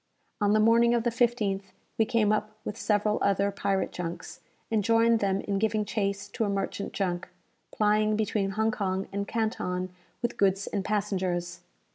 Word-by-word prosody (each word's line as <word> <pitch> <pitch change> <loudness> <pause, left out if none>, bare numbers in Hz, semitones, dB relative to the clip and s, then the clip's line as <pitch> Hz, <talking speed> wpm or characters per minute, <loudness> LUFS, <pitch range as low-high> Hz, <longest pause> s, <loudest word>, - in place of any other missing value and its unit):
On 205 0 +3
the 215 - +4
morning 230 +2 +5
of 235 - +1
the 240 - +1
15th, 230 -5 +1 0.4
we 220 - +5
came 220 -3 +2
up 215 0 -1
with 210 - -4
several 210 0 +1
other 200 0 +2
pirate 195 -1 -1
junks, 170 -1 -6 0.3
and 215 -2 +2
joined 230 +1 +4
them 195 -1 +1
in 200 -1 -1
giving 215 0 +1
chase 200 -2 -2
to 230 - -2
a 205 - 0
merchant 200 0 -2
junk, 180 -3 -2 0.4
plying 215 0 +2
between 210 -2 0
Hong 220 0 +2
Kong 195 -4 -2
and 200 0 -2
Canton 185 -5 -2 0.3
with 240 - -1
goods 195 0 +2
and 200 - -2
passengers. 185 -4 -1
205 Hz, 170 wpm, -28 LUFS, 195-220 Hz, 0.4 s, morning